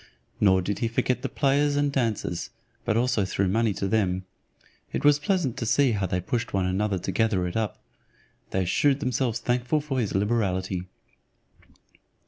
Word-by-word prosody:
Nor 95 -2 +4
did 100 +2 -2
he 115 - +1
forget 125 +2 0
the 135 - -3
players 145 0 +2
and 145 0 +1
dancers, 115 -9 -1 0.4
but 110 - +1
also 120 -3 +2
threw 95 0 0
money 110 +3 +2
to 100 - -2
them. 95 -3 0 0.7
It - - -2
was 145 0 +6
pleasant 155 - 0
to 115 - -2
see 130 +3 +3
how 100 -3 0
they 90 +1 -1
pushed 115 +4 -2
one 95 -1 +1
another 95 +2 0
to 95 - -3
gather 100 -2 +1
it 90 - -4
up. 110 -3 -1 0.7
They 95 -1 0
shewed 140 +9 +2
themselves 125 -4 0
thankful 125 +5 0
for 145 -3 -2
his 110 -6 -1
liberality. 95 -3 0
110 Hz, 170 wpm, -26 LUFS, 95-130 Hz, 0.7 s, was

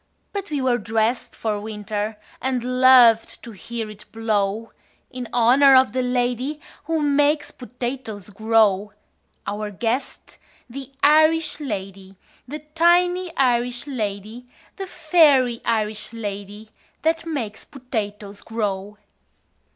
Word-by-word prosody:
But 400 -2 -4
we 290 -3 -2
were 245 -2 +2
dressed 225 +2 -1
for 210 -2 -2
winter, 210 0 -4 0.2
And 255 -1 -1 0.2
loved 245 -3 +6
to 235 - -9
hear 225 +2 -6
it 210 0 -15
blow 220 -1 -1 0.4
In 250 -3 -6
honor 260 +4 +5
of 260 0 +5
the 255 - -1
lady 250 +3 -1 0.3
Who 320 -1 -1
makes 290 +1 +2
potatoes 245 -5 -6
grow 210 -1 +2 0.5
Our 210 +1 -4
guest, 230 +6 -4 0.3
the 270 +2 -9
Irish 310 +1 +4
lady, 195 -7 -6 0.3
The 300 +3 -8
tiny 355 +2 +3
Irish 245 -1 +1
lady, 220 -2 -5 0.3
The 385 -1 -5
fairy 290 -9 +3
Irish 215 -2 -1
lady 205 0 -7 0.3
That 325 +1 0
makes 235 -10 -4
potatoes 210 -6 -6
grow. 210 -2 -4
240 Hz, 115 wpm, -22 LUFS, 210-275 Hz, 0.5 s, loved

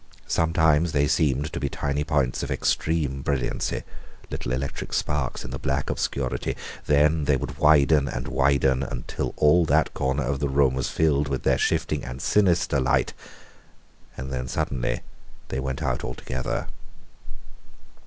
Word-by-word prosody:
Sometimes 80 -1 +2
they 70 0 +3
seemed 75 +1 +1
to - - -2
be 70 - -1
tiny 70 +1 -2
points 70 -4 0
of - - -4
extreme 75 -4 0
brilliancy 70 -2 -1 0.5
little - - -4
electric 65 +2 -3
sparks 75 -4 -1
in 65 - -7
the 65 - -5
black 65 +1 -1
obscurity 60 -3 -2 0.3
then 75 +1 +3
they 70 -1 +3
would 65 +2 -6
widen 75 -1 +5
and - - -4
widen 65 -1 +2
until 60 -3 -4
all 75 +4 +5
that - - +2
corner 65 +2 0
of 70 +1 -1
the 70 0 0
room 70 -1 +3
was 65 0 -1
filled 75 -2 +2
with 70 -2 -3
their - - +2
shifting 75 -2 0
and 65 +1 -6
sinister 85 -5 +2
light. 65 - +1 1.0
And 65 +2 -5
then 65 -1 -3
suddenly 65 -1 -2 0.5
they - - -2
went 65 0 -3
out - - -1
altogether. 65 -1 -3
70 Hz, 150 wpm, -25 LUFS, 65-75 Hz, 1.0 s, widen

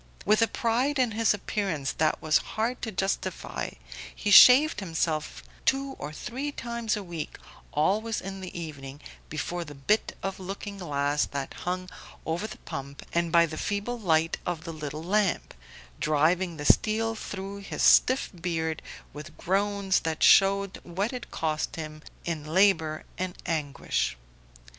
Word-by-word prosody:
With 215 +2 +4
a 225 - +5
pride 245 +6 0
in 250 -3 +2
his 225 +1 +2
appearance 195 -8 -1
that 155 -1 +1
was 155 0 +4 0.2
hard 235 +3 0
to 225 - -3
justify 190 -2 -2 0.5
he 205 - -1
shaved 260 - +9
himself 160 -4 -2 0.2
two 270 +1 +1
or 150 - -5
three 260 - -4
times 235 -4 -2
a 205 - -5
week, 170 -4 -6 0.3
always 210 +9 +1
in 195 0 -7
the 180 -1 -6
evening, 140 -4 -7 0.3
before 170 +3 -3
the 145 -3 -10
bit 175 +11 0
of 195 0 -3
looking 195 +2 -6
glass 145 -3 0
that 140 -1 -4
hung 185 +1 -3 0.4
over 170 +6 -2
the - - -9
pump 140 +1 -7
and 170 -1 +1
by 170 0 +6
the 155 -1 -6
feeble 210 +4 -2
light 165 -5 +2
of 170 -3 -3
the 165 -1 -6
little 155 0 -6
lamp 195 +1 +1 0.5
driving 165 +3 +2
the 145 - -5
steel 225 +6 +3
through 200 -2 -6
his 200 - -4
stiff 255 +1 +5
beard 165 -3 -2 0.3
with 150 +2 -10
groans 200 0 +1
that 160 -1 -2
showed 195 0 +5
what 195 +7 -2
it 250 - -6
cost 155 -1 -2
him 155 -1 -7 0.2
in 160 -3 -3
labour 160 -2 +2 0.2
and 185 -1 -3
anguish. 145 - -1
180 Hz, 155 wpm, -27 LUFS, 155-210 Hz, 0.5 s, shaved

